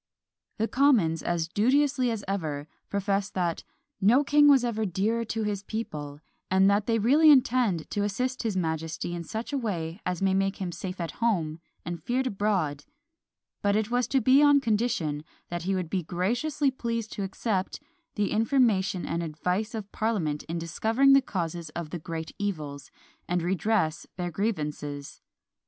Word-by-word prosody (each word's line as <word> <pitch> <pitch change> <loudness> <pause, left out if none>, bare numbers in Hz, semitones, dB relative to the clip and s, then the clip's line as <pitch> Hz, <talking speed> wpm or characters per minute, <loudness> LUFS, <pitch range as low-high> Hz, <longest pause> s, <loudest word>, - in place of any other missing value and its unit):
The 225 - 0
Commons, 230 - +3
as 170 -2 -1
duteously 255 - +2
as 225 -3 -3
ever, 155 -7 -3 0.2
profess 200 0 0
that 175 -3 -2 0.4
"No 235 +9 +5
king 290 +1 +5
was 270 -4 +6
ever 220 -2 -1
dearer 210 +5 0
to 225 0 -2
his 205 -2 -2
people, 150 -10 -5 0.3
and 190 +1 +4
that 200 +1 +1
they 230 -1 +2
really 285 +9 +5
intend 245 - +4
to 205 - -1
assist 250 +6 -1
his 220 -5 -1
majesty 160 0 -2
in 170 -1 -4
such 220 - -5
a 280 - +1
way 175 -6 -3
as 180 -2 -2
may 195 -1 +2
make 195 0 +1
him 185 -3 -3
safe 180 +2 -6
at 170 -1 -3
home 170 -9 +1 0.3
and 170 0 -5
feared 255 +2 0
abroad" 195 - 0 0.8
but 200 0 +2
it 215 +1 0
was 245 0 +1
to 270 - +2
be 260 +5 +5
on 290 -1 +6
condition 210 - 0 0.3
that 175 0 -3
he 195 - +2
would 180 -2 -2
be 185 +3 -1
graciously 240 - 0
pleased 230 -3 -3
to - - -4
accept 195 0 -2 0.4
"the 205 -1 0
information 215 -5 +2
and 170 +1 -2
advice 180 +8 -2
of 205 -2 -6
parliament 180 -10 -1
in 165 +1 -4
discovering 220 +11 +3
the 275 - +7
causes 170 - -4
of 170 -3 -5
the 175 - -4
great 160 0 -5
evils, 150 -8 -4 0.4
and 175 -1 0
redress 185 -2 0
their 175 -1 -3
grievances." 150 -7 -3
200 Hz, 170 wpm, -27 LUFS, 170-230 Hz, 0.8 s, the